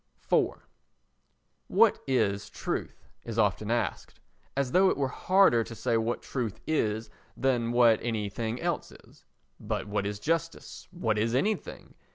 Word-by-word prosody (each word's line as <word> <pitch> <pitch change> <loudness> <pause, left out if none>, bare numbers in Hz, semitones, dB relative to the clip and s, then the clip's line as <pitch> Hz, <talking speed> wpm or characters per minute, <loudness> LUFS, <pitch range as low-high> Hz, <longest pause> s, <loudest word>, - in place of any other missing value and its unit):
iv - - +1 1.0
"What - - +4
is 105 -7 +1
Truth?" - - -5 0.2
is 115 -1 -6
often 105 -1 +1
asked, 120 +1 -2 0.4
as 140 -2 0
though 190 +4 +5
it - - 0
were 140 -1 +1
harder 185 -6 +4
to 115 - -9
say 115 +2 0
what 115 +1 -1
truth 115 -5 -3
is 110 -8 -1 0.3
than 120 -3 +1
what 120 -2 +5
anything 110 +1 -2
else - - -2
is. - - -18 0.3
But - - -3
what 100 -1 -1
is 105 0 -3
Justice? 165 +6 -3
What 115 - -1
is 115 +2 +1
anything? 210 +11 -2
115 Hz, 145 wpm, -28 LUFS, 110-135 Hz, 1.0 s, though